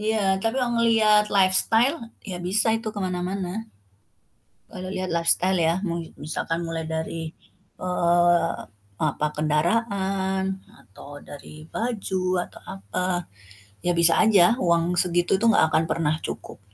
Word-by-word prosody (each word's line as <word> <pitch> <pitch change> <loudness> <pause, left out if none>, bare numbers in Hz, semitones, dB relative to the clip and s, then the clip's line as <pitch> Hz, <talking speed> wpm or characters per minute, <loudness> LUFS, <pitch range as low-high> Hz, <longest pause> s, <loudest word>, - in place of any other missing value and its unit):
Iya, 220 +1 0 0.3
tapi 225 +1 0
kalau 245 -1 -1
ngelihat 215 -2 +4
lifestyle, 215 - +4 0.3
ya 180 - -4
bisa 215 +5 +3
itu 225 0 -5
ke 205 - -5
mana-mana. 185 +3 -3 1.1
Kalau 185 0 -7
lihat 185 0 -3
lifestyle 170 +2 +2
ya, 165 -1 +2
mau 170 0 -2 0.3
misalkan 165 +2 -3
mulai 165 -1 -4
dari, 160 0 -5 0.5
eee, 175 -1 +2 0.5
apa, 150 0 0
kendaraan 190 +4 0 0.4
atau 95 +8 -15
dari 155 +1 -12
baju, 205 -5 -2 0.2
atau - - -15 0.2
apa, 185 -2 -3 0.6
ya 180 - +2
bisa 170 0 +7
aja 205 -1 +5
uang 170 -3 +1
segitu 175 +1 +2
tuh 230 0 +4
gak 160 - +5
akan 160 - +3
pernah 155 -2 0
cukup. - - -7
180 Hz, 130 wpm, -24 LUFS, 165-205 Hz, 1.1 s, bisa